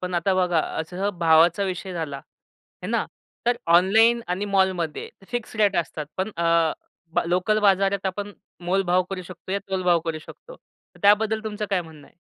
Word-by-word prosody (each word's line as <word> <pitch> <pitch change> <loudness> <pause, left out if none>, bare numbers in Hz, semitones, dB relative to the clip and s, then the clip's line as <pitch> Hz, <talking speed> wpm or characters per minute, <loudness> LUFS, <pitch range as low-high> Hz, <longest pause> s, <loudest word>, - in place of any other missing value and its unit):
पण 180 0 -4
आता 180 +3 +1
बघा 180 -3 +2 0.2
असं 185 +5 -3
भावाचा 165 +3 +4
विषय 185 0 -4
झाला, 155 -5 -4 0.6
हे - - -4
ना? - - 0 0.4
तर 240 0 +3
ऑनलाईन 215 +8 +5
आणि 180 +3 -1
मॉलमध्ये 190 -5 0 0.2
फिक्स 240 -2 -5
रेट 205 -3 +3
असतात 155 -3 -2
पण 190 +3 -2
अ, 165 -1 +2 0.4
ब - - +2
लोकल 185 +5 +2
बाजारात 195 -1 +2
आपण 205 +2 -4 0.3
मोलभाव 185 0 +2
करू 185 -1 -4
शकतो 185 +1 -9
या 200 - +1
तोलभाव 180 -3 +2
करू 160 -2 -3
शकतो. - - -13 0.4
तर - - -19
त्याबद्दल 215 +2 +4
तुमचं 210 0 -4
काय 190 -2 +2
म्हणणं 155 -3 -14
आहे? - - -24
185 Hz, 170 wpm, -24 LUFS, 170-200 Hz, 0.6 s, ऑनलाईन